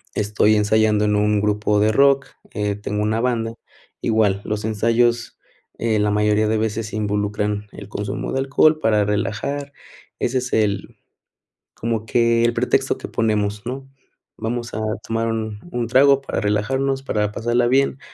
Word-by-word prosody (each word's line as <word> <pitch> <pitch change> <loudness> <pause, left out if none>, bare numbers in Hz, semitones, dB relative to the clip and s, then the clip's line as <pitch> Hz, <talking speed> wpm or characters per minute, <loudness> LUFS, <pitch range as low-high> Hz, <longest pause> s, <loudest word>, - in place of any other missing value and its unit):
estoy 105 +1 +2
ensayando 105 0 +2
en 105 0 +2
un 105 0 +2
grupo 105 0 +1
de 110 +1 +3
rock, 140 +1 +4 0.3
eh, 105 -1 -1
tengo 105 0 -3
una 110 +2 0
banda. 115 -2 -1 0.5
Igual 105 -3 +1
los 105 0 -3
ensayos 115 +2 +1 0.4
en 110 -2 +1
la 105 - +1
mayoría 105 +1 +2
de 110 0 +1
veces 110 0 -2
se 110 - -7
involucran 105 0 -1
el 100 - -10
consumo 100 -1 -4
de 135 - -1
alcohol 155 +4 +3
para 105 -6 +2
relajar, 125 +8 -2 0.5
ese 130 +2 0
es 125 0 -3
el 100 -3 0 0.8
como 115 -1 -3
que 115 -1 +2
el 120 - +2
pretexto - - +1
que - - -7
ponemos, 105 -2 -1
¿no? 135 +1 -5 0.5
Vamos 120 +1 -4
a 110 - -3 0.3
tomar 115 0 -1
1, 110 -2 -3 0.3
trago 140 +2 +5
para 135 - -3
relajarnos, 135 +7 0
para 105 -5 -1
pasarla 120 +2 +1
bien, 135 +1 +2
110 Hz, 155 wpm, -21 LUFS, 105-120 Hz, 0.8 s, trago